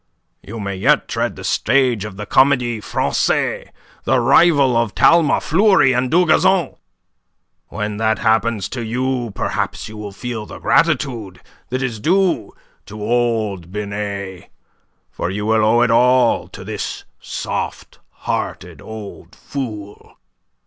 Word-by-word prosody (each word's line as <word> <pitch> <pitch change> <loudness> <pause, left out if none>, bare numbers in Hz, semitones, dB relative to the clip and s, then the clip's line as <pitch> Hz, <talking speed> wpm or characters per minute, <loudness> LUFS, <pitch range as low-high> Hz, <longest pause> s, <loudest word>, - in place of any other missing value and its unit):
You 115 +2 -8
may 100 -2 -4
yet 95 - +2
tread - - -2
the - - -10
stage 125 -7 +1
of 100 -3 -8
the 105 - -5
Comedie 125 -2 +2
Francaise, - - -1 0.4
the 130 - +2
rival 140 +1 +4
of 115 -3 0
Talma, 165 -3 +4
Fleury, 190 -5 +3
and 125 +1 0
Dugazon. 175 0 +3 0.9
When 105 -1 -4
that 110 0 +1
happens 110 -2 +1
to 120 -3 -5
you 125 +1 -2
perhaps - - -3
you 110 - -10
will 105 -1 -7
feel 110 0 -6
the - - -9
gratitude 110 -8 0 0.3
that 130 +1 -2
is 120 -4 -3
due 185 - +1 0.4
to 105 +2 -9
old 110 -5 -1
Binet, 100 -2 -5 0.6
for - - -3
you 105 +2 -3
will 110 0 +2
owe 115 +2 +4
it 120 - +2
all 125 +1 +3
to - - -11
this - - -5 0.2
soft - - -5
hearted - - -5
old 110 -2 -10
fool." 105 -7 -7
115 Hz, 135 wpm, -19 LUFS, 105-130 Hz, 0.9 s, rival